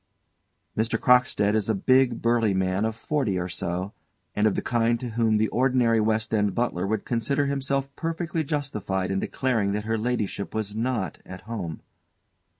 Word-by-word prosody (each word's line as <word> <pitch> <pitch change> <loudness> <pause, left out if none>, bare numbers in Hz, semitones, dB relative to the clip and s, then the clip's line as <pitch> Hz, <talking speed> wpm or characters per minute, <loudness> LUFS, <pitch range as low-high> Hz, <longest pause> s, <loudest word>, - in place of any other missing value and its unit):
_ - - +3
MR. 115 0 0
CROCKSTEAD 125 -5 +4
_is 110 -1 0
a 110 - +2
big, 130 +3 +3
burly 115 -4 +2
man 95 +2 +1
of 110 -1 -2
forty 120 -5 -1
or 90 0 -2
so, 90 +2 -3 0.4
and 105 +1 +3
of 105 - +1
the - - -1
kind 120 0 +1
to 125 - -4
whom 110 -1 +2
the 110 +1 +2
ordinary 125 -3 +3
West 110 +1 0
End 105 -2 +1
butler 100 -6 0
would 110 +2 -1
consider 130 +5 0
himself 140 0 -1
perfectly 165 0 -2
justified 105 - -2
in 95 - 0
declaring 110 -6 0
that 105 +1 -2
her 110 0 0
ladyship 110 -4 -2
was 105 -1 -2
not 115 -3 -2
at 95 0 -9
home. 100 -8 -6
110 Hz, 175 wpm, -25 LUFS, 100-125 Hz, 0.4 s, CROCKSTEAD